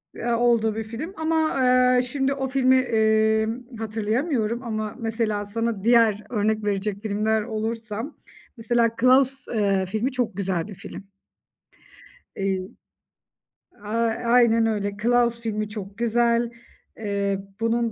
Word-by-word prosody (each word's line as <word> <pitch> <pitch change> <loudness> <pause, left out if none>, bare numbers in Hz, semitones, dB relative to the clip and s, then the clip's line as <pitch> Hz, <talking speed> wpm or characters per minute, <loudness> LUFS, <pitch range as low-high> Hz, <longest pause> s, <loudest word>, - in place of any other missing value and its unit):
eee, 235 0 -2
olduğu 230 -2 +2
bir 225 - -3
film. 240 - -7
Ama, 320 -3 0
eee, 250 0 +4
şimdi 270 +2 -1
o 270 -1 -3
filmi, 260 -1 +3
emm, 220 +1 +1
hatırlayamıyorum 225 +2 -1
ama 215 -2 -4
mesela 225 -2 -1
sana 225 -1 -2
diğer 225 -3 +4
örnek 215 -1 0
verecek 200 0 -2
filmler 215 +1 0
olursa, 220 0 -4 0.5
mesela 230 0 +2
Claus, 265 +1 +4
eee, 200 -4 +1
filmi 220 +8 -2
çok 235 -6 -2
güzel 190 -2 -1
bir 205 - -9
film. 195 - -9 1.3
Eee, 190 -1 -2 1.2
ay 225 +2 -1
aynen 235 -1 +4
öyle, 205 -2 -1
Claus 235 0 +2
filmi 215 -2 -3
çok 205 -2 -8
güzel. 235 0 +1 0.5
Eee, 200 -2 -1 0.2
bunun 230 0 0
225 Hz, 125 wpm, -24 LUFS, 210-240 Hz, 1.3 s, eee